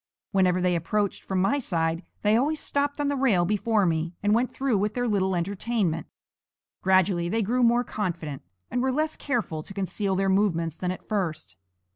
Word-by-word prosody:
Whenever 185 -2 +3
they 180 -1 +2
approached 200 +5 -1
from 190 -1 -2
my 195 +10 +2
side, 165 -7 -1 0.2
they 210 +1 +4
always 295 +6 +1
stopped 285 +1 -1
on 290 - +1
the 285 - 0
rail 230 -10 +3
before 210 +1 +1
me 165 0 -1
and 205 0 +3
went 240 +3 +2
through 270 -4 0
with 210 +1 -1
their 245 0 0
little 190 -3 +1
entertainment. 185 -2 -1 0.7
Gradually 185 -2 +3
they 225 +3 +1
grew 245 +5 +1
more 240 0 +4
confident, 170 - -4 0.3
and 245 - 0
were 260 +1 +1
less 310 +3 0
careful 225 - -2
to 195 - -12
conceal 195 0 -1
their 195 +1 +1
movements 175 -5 +1
than 180 - -3
at 185 - -5
first. 160 - -2
195 Hz, 185 wpm, -26 LUFS, 175-235 Hz, 0.7 s, they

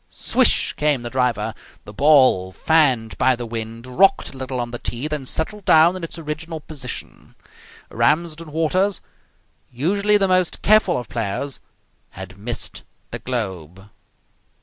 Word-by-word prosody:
Swish - - +2
came 150 -4 +1
the 120 - -6
driver. 120 -4 0 0.3
The 105 - -10
ball, 130 -8 +4
fanned 130 - +2
by 130 -1 +4
the 120 0 -6
wind, 115 0 -6
rocked 195 +11 +2
a - - -11
little 130 -1 -4
on 120 0 -3
the 120 - -6
tee, 120 +5 -4
then 150 -4 -4
settled 205 +9 -3
down 160 +2 +5
in 185 - -7
its 165 - -6
original 160 +1 -5
position. 145 -4 -8 0.6
Ramsden 160 +1 0
Waters, 180 +5 +1 0.7
usually 200 +11 +2
the 195 -1 +2
most 185 -2 +1
careful 215 +1 +4
of 125 -2 -5
players, 115 +5 -3 0.5
had 95 0 -10
missed 120 +3 -5 0.3
the - - -4
globe. 95 -6 -5
135 Hz, 145 wpm, -21 LUFS, 115-165 Hz, 0.7 s, down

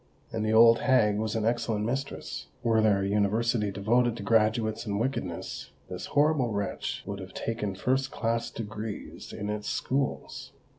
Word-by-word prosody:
And 110 -1 -2
the 110 - +1
old 115 +1 +7
hag 110 -6 +3
was 110 0 -1
an 110 -1 0
excellent 115 -2 0
mistress: 135 +4 -4 0.2
were 115 -1 +3
there 100 -3 +3
an 100 - -1
University 105 +1 +1
devoted 115 +5 +1
to 105 - -6
graduates 110 +1 +2
in 100 -1 -1
Wickedness, 110 -7 -3 0.2
this - - -5
horrible 145 -5 +2
wretch 100 -1 -3
would 100 0 -5
have 95 0 -9
taken 105 -4 -3
first 130 +7 0
class 115 -2 -1
Degrees 110 -1 -6
in 105 - -5
its 105 0 -3
schools. 135 +1 -2
110 Hz, 160 wpm, -28 LUFS, 105-120 Hz, 0.2 s, old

